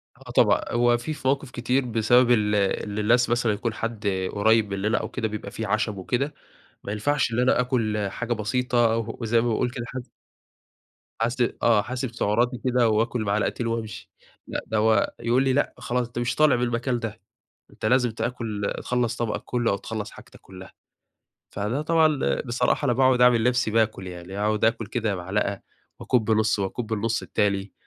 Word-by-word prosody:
آه - - -12
طبعًا. - - +4
هو 120 0 +3
في 150 +6 -5
مواقف 135 0 0
كتير 125 +2 0
بسبب 120 +2 +3
ال 105 -3 +3
اللي 100 +1 -1
الناس 120 +3 +3
مثلًا 120 -2 +1
يكون 115 +2 -3
حد 115 -1 -4 0.2
قريّب 110 0 +2
مننا 105 +4 0
أو - - -3
كده، 110 - -2
بيبقى 105 0 -6
فيه 110 -2 -4
عَشَم 105 0 0
وكده، 130 +10 -2 0.5
ما 100 - -4
ينفعش 125 +4 0
إن 115 - -1
أنا 125 0 +3
آكُل 110 -5 0
حاجة 120 +4 -4
بسيطة، 120 +1 +1 0.2
وزي 115 0 +2
ما 120 - 0
باقول 120 +2 0
كده 120 -1 -5
حاس 130 -1 -7 1.1
حاس 115 +2 0 0.3
آه. 115 -3 +5
حاسب 125 0 -4
سُعَراتي 120 +3 +1
كده، 125 -2 +3
وآكُل 115 +2 0
معلقتين 105 +3 -1
وامشي. 115 -1 -4 0.4
لأ - - -3
ده 110 - -1
هو 110 -1 +2
يقول 120 +3 +2
لي: 130 -1 +2
"لأ 145 - +1
خلاص 125 0 -2
أنت 120 0 -6
مش 120 +1 -1
طالع 155 -4 +4
من 120 - -1
المكان 120 +1 -1
ده، 115 -3 -6 0.5
أنت - - -7
لازم 125 +1 +3
تاكل 110 -3 -3
تخلّص 125 -2 0
طبقك 115 -2 -2
كله، 120 -2 0
أو 100 - 0
تخلّص 105 -1 -6
حاجتك - - -15
كلها." 95 0 -12 0.8
فده 105 +8 -2
طبعًا 155 -2 +2
بصراحة 125 +4 0
أنا 125 - +3
باقعد 130 0 +3
أعمل 120 -2 +5
نفسي 125 -2 +1
باكل 110 -4 0
يعني، 90 +2 -8
أقعد 105 +1 +1
آكُل 115 0 +1
كده 110 -2 -2
معلقة 95 +2 -2 0.4
واكُب 115 -3 +1
نص، 110 -1 +2
واكُب 110 +3 -3
النص 115 +2 -1
التاني. 100 -1 -1
115 Hz, 175 wpm, -25 LUFS, 105-125 Hz, 1.1 s, آه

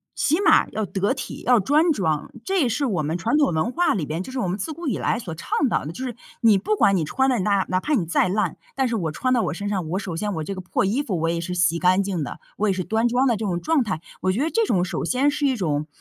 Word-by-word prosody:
起 320 +6 +1
码 - - +5
要 215 -1 -2
得 195 +3 -1
体， 265 - -7
要 245 -2 +5
端 300 - +3
庄， 160 - -1
这 385 0 +1
也 260 - +3
是 280 +5 0
我 185 -10 0
们 160 +4 -1
传 230 - 0
统 290 -9 +3
文 160 +10 0
化 345 +2 +2
里 165 -7 -2
边， 160 +4 -3
就 260 - -9
是 265 - -6
我 190 - -1
们 180 +2 -2
自 315 - -3
古 335 0 -6
以 235 - 0
来 225 - 0
所 185 -9 -6
倡 240 - -1
导 - - 0
的， 155 - -4
就 255 +10 -7
是 245 - -5 0.3
你 225 -4 +6
不 425 - 0
管 200 - +4
你 170 - +1
穿 265 - +1
得 245 - +1
哪 200 0 +1
哪 185 - +1
怕 300 +10 0
你 185 - 0
再 175 +2 +2
烂， 210 +3 -1 0.2
但 265 -1 +1
是 235 - -1
我 170 -7 -1
穿 255 +11 0
到 240 - +3
我 - - -1
身 205 0 -4
上， 190 -5 -2
我 180 - -1
首 190 -4 -4
先 205 +5 -2
我 160 - -3
这 195 - -4
个 185 - -6
破 180 +1 -1
衣 235 +9 +1
服 190 - -2
我 165 - 0
也 170 0 -1
是 180 +1 -4
洗 175 -2 +2
干 185 +2 +3
净 190 -5 -2
的， - - -7 0.2
我 215 - +1
也 - - +2
是 185 -1 -2
端 225 +4 +1
庄 245 +3 +2
的 235 - +3
这 220 - -4
种 175 -3 -1
状 310 - +2
态。 185 -7 -3 0.2
我 185 - +2
觉 225 +9 0
得 320 - -1
这 455 - +2
种 180 -3 +2
首 - - -3
先 260 - +2
是 285 0 0
一 265 - +1
种， 155 -8 -1
200 Hz, 335 characters per minute, -23 LUFS, 180-255 Hz, 0.3 s, 你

